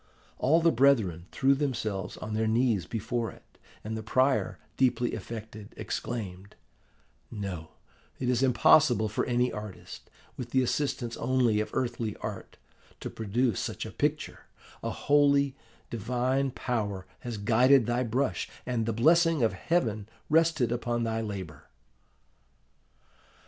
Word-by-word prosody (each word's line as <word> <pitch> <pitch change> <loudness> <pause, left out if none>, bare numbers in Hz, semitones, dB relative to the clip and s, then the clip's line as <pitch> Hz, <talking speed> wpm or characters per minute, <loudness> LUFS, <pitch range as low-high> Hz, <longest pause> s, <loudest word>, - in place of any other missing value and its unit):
All 160 +6 +4
the 165 0 +5
brethren 115 - +3
threw 135 +1 +3
themselves 110 -9 -2
on 110 - -6
their 110 +1 +1
knees 110 -5 +1
before 115 +1 -2
it; - - -17 0.2
and 110 +1 -4
the 110 - -4
prior, 130 +5 +1 0.2
deeply 125 -2 +1
affected, 110 -2 -8
exclaimed, 100 -4 -5 0.7
'No, 95 -7 -6 0.4
it 125 - -3
is 125 0 +2
impossible 125 -2 +5
for 110 - -1
any 125 0 +1
artist, 105 -2 -8 0.3
with 120 -2 -5
the 130 +1 +2
assistance 125 -3 -1
only 125 -5 +2
of 105 - -2
earthly 120 -4 -2
art, - - -7 0.4
to - - -6
produce 110 +1 0
such - - -4
a - - -7
picture: - - -2 0.3
a - - -2
holy, 140 -1 +3 0.4
divine 125 +4 0
power 105 -7 -3
has 120 -3 -5
guided 120 +5 +4
thy 120 +2 0
brush, 130 +3 -1 0.2
and 115 -3 -1
the 115 - 0
blessing 165 +4 +4
of 110 - +2
Heaven 110 - -1 0.2
rested 160 -6 +3
upon 120 0 -1
thy 115 0 -1
labour! 95 -9 -6
120 Hz, 135 wpm, -29 LUFS, 110-130 Hz, 0.7 s, the